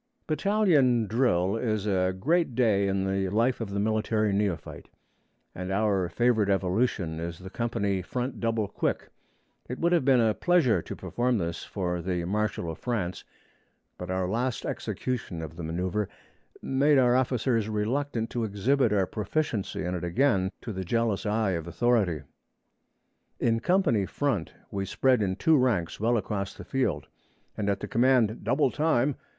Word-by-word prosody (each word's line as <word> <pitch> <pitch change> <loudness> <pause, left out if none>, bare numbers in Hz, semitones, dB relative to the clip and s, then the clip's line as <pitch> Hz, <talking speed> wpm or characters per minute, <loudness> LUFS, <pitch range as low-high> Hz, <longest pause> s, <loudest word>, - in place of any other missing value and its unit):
Battalion 155 - +3
drill 100 -4 +1
is 110 -3 -1
a 95 -3 +1
great 160 - +1
day 105 -5 +3
in 95 0 0
the 95 0 0
life 115 +5 +1
of 110 - -3
the 100 0 -2
military 110 0 +1
neophyte, 100 -4 -2 0.6
and 90 +1 -5
our 100 -3 +1
favorite 110 0 +2
evolution 95 -3 0
is 85 0 -5
the 95 +1 -10
company 100 -5 -1
front 125 +7 -4
double 115 -2 0
quick. - - -2 0.6
It 125 - -4
would 170 +1 +1
have 175 -5 +3
been 130 -1 +4
a 110 -2 +3
pleasure 135 - +2
to - - -7
perform 120 0 -1
this 85 -3 -3
for 90 -3 -3
the 90 -1 -2
Marshal 95 -3 -1
of 80 - -9
France, 105 -8 -3 0.8
but 90 - -6
our 95 0 -1
last 120 +5 -1
execution 120 -9 -3
of 80 0 -8
the 85 - -7
manoeuvre 90 +5 -2 0.6
made 140 +2 +3
our 125 -2 +4
officers 125 -3 +1
reluctant 115 +2 -1
to 120 - -2
exhibit 110 +4 +1
our 100 -2 +2
proficiency 110 +2 -2
in 90 0 -2
it 90 - -4
again 95 +1 +2
to 115 - -5
the 95 0 -4
jealous 115 +2 0
eye 105 -1 +1
of 85 -2 -3
authority. 100 - +1 1.2
In 115 -1 +2
company 145 - +2
front, 125 - -2 0.2
we 100 -1 -2
spread 130 +4 +2
in 95 -2 0
two 160 - +3
ranks 110 -10 0
well 115 +3 +2
across 100 -1 -3
the - - -10
field, 105 - -1 0.5
and 100 -1 -1
at 100 -1 -1
the - - -4
command 120 -2 +2
'Double 135 -1 +2
time!' 150 -3 +1
110 Hz, 160 wpm, -27 LUFS, 95-125 Hz, 1.2 s, been